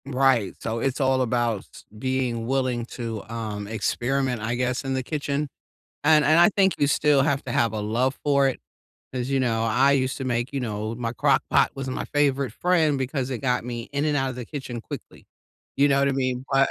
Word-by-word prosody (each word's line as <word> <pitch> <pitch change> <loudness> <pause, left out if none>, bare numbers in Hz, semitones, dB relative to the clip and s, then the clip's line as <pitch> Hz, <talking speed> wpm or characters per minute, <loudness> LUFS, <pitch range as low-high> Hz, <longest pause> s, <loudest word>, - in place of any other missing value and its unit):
Right. 130 -6 +2
So, 115 +1 -3
it's 135 +3 -1
all 130 -1 +2
about 120 -4 0 0.3
being 125 -2 -1
willing 130 -3 0
to, 115 -4 -5
um, 110 -3 -4
experiment, 120 +3 -1
I 115 +2 -1
guess, 125 +1 -1
in 135 -1 -2
the 130 - -1
kitchen, 145 +1 -2 0.6
and 155 -1 +6
and 155 +3 +5
I 175 - +7
think 195 -2 +2
you 145 - +2
still 145 -1 +3
have 140 0 +1
to 130 - -5
have 115 -2 +1
a 110 - -2
love 120 +6 0
for 140 -1 +3
it. 130 - -2 0.5
As 130 0 -3
you 135 - +2
know, 115 -3 +1
I 125 +5 +3
used 130 -1 +1
to 135 - -4
make, 125 +1 -1
you 140 - -2
know 110 -2 -3
my 115 -1 -3
crockpot 135 +2 +3
was 135 -1 -4
my 130 - -3
favorite 140 -4 +1
friend 160 -2 +2
because 135 0 -2
it 125 - -2
got 125 -3 0
me 120 -1 -5
in 140 +1 0
and 150 -1 +1
out 135 -1 0
of 125 - -7
the 125 - -5
kitchen 130 -4 -6
quickly. - - -10 0.5
You 140 - +5
know 140 0 +3
what 140 - +3
I - - +1
mean? 130 -1 -1
But 135 0 +4
130 Hz, 215 wpm, -25 LUFS, 120-140 Hz, 0.6 s, I